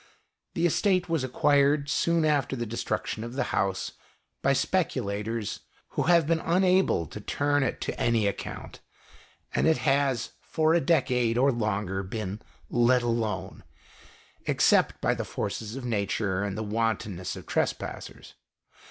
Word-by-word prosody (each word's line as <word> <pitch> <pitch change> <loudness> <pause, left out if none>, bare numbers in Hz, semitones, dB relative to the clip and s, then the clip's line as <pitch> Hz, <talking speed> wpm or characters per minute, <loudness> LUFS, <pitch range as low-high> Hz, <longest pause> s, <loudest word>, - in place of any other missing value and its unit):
The 165 - +1
estate 185 +1 +2
was 165 -5 0
acquired, 140 +2 +3
soon 170 +2 +2
after 145 -4 +1
the 120 -2 -3
destruction 110 0 -3
of 120 +1 -6
the 135 - 0
house, 95 -1 0 0.5
by - - +3
speculators 105 +2 -1 0.3
who - - -2
have 170 -3 +5
been 165 +1 +1
unable 185 - +2
to 105 +7 -9
turn 145 +6 +1
it 135 - -1
to - - -4
any 115 -3 +2
account, 100 - -4 0.7
and - - +2
it 160 - +4
has 135 -4 +1
for 160 0 +1
a 170 - +3
decade 125 -8 +2
or 135 +3 +4
longer 105 -5 -1
been 100 +1 -5 0.2
" - - -30 0.2
let 125 -1 +3
alone," 115 -5 -2 0.8
except - - +3
by - - +2
the - - -3
forces 105 +2 -4
of 135 -2 -6
Nature 100 -3 -1
and 100 -1 -3
the 110 - -2
wanton 110 -3 -1
ness 95 +1 -4
of - - -9
trespassers. - - -3
120 Hz, 150 wpm, -27 LUFS, 105-145 Hz, 0.8 s, have